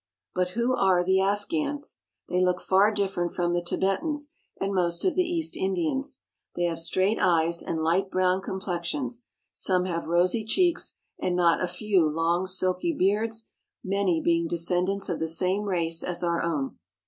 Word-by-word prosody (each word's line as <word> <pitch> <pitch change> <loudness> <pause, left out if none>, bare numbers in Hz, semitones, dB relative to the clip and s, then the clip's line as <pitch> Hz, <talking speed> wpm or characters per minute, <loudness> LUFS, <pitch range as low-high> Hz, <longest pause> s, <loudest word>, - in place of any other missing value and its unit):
But 180 0 0
who 250 +2 +2
are 190 -6 +3
the 190 +1 +3
Afghans? 285 - -2 0.3
They 180 - 0
look 180 0 +1
far 195 +3 +3
different 195 -4 -1
from 175 0 0
the 175 - +1
Tibetans, 240 - -1 0.3
and 195 +1 -1
most 170 -2 0
of 370 - +3
the 365 - +3
East 340 -2 -1
Indians. 195 - -2 0.3
They 175 - -1
have 170 -1 0
straight 185 +5 +1
eyes 170 -1 +2
and 160 -1 -3
light 180 +4 +1
brown 185 0 +1
complexions; 195 - -4 0.3
some 185 -1 +2
have 170 -2 -3
rosy 180 +6 +2
cheeks, 345 - +1 0.2
and 180 - -1
not 170 -2 +3
a 180 - +1
few 185 -3 +1
long, 165 +4 0
silky 185 - +1
beards, 220 +3 +1 0.4
many 190 -3 +1
being 170 0 +2
descendants 180 +4 0
of 175 - -2
the 160 - -1
same 185 +5 0
race 165 -4 0
as 180 0 -2
our 170 -1 +1
own. 150 -5 -2
185 Hz, 165 wpm, -26 LUFS, 175-205 Hz, 0.4 s, are